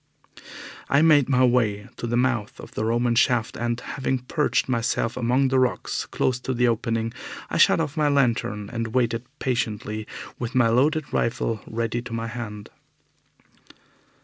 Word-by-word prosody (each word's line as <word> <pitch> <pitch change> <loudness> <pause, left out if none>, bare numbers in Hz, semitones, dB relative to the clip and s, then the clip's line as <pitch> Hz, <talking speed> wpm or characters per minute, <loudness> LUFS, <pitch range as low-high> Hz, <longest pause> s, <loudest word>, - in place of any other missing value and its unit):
I 140 +2 +4
made 145 -5 +5
my 130 -1 +4
way 110 -5 +1
to 120 - -4
the 120 +1 0
mouth 120 -4 0
of - - -10
the - - -3
Roman 120 +1 +1
shaft, 115 -1 +2
and, 120 0 -2
having 130 +1 -2
perched 140 +4 0
myself 115 -2 0
among 125 +3 +2
the 130 0 +3
rocks 130 -1 -1
close 125 -1 0
to 130 0 -3
the 125 +1 +3
opening, 115 0 -1 0.4
I - - 0
shut - - +6
off 150 -3 -2
my 150 -2 +2
lantern 115 -7 0
and 115 0 -3
waited 115 -1 +1
patiently 110 -5 -2 0.3
with 120 +1 -4
my 120 -3 +4
loaded 145 +6 +1
rifle 115 -2 -1
ready 115 +1 -2
to 120 -1 -8
my 115 0 -2
hand. 110 -3 -7
120 Hz, 160 wpm, -24 LUFS, 115-130 Hz, 0.4 s, shut